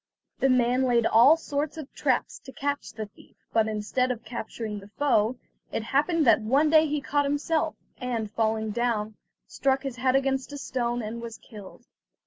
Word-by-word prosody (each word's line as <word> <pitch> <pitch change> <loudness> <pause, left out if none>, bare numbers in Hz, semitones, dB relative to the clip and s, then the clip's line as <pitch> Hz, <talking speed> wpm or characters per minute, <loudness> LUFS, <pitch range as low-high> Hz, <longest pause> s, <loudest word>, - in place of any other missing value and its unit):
The 270 - +3
man 250 0 +3
laid 240 -2 +3
all 250 +10 +6
sorts 295 0 -3
of 305 -4 -8
traps - - 0
to 265 - -12
catch 285 +1 -3
the 220 0 -5
thief, 205 - -20 0.2
but 225 -1 +3
instead 220 +4 -1
of 245 -2 -4
capturing 220 -2 -5
the 200 - -13
foe, 250 -4 +2 0.3
it - - -2
happened 300 +6 +1
that 230 -1 +5
one 275 +8 +2
day 315 0 +6
he 295 0 -1
got - - -14
caught 290 0 +3
himself, 310 +3 0 0.2
and 235 -4 -3
falling 220 -1 0
down, 220 -2 -1 0.3
struck 270 0 0
his 270 -3 -5
head 255 +1 +2
against 270 0 0
a - - -5
stone, 240 -3 -2
and 225 +2 -5
was 230 -1 -7
killed. 210 +2 -13
250 Hz, 185 wpm, -27 LUFS, 220-280 Hz, 0.3 s, all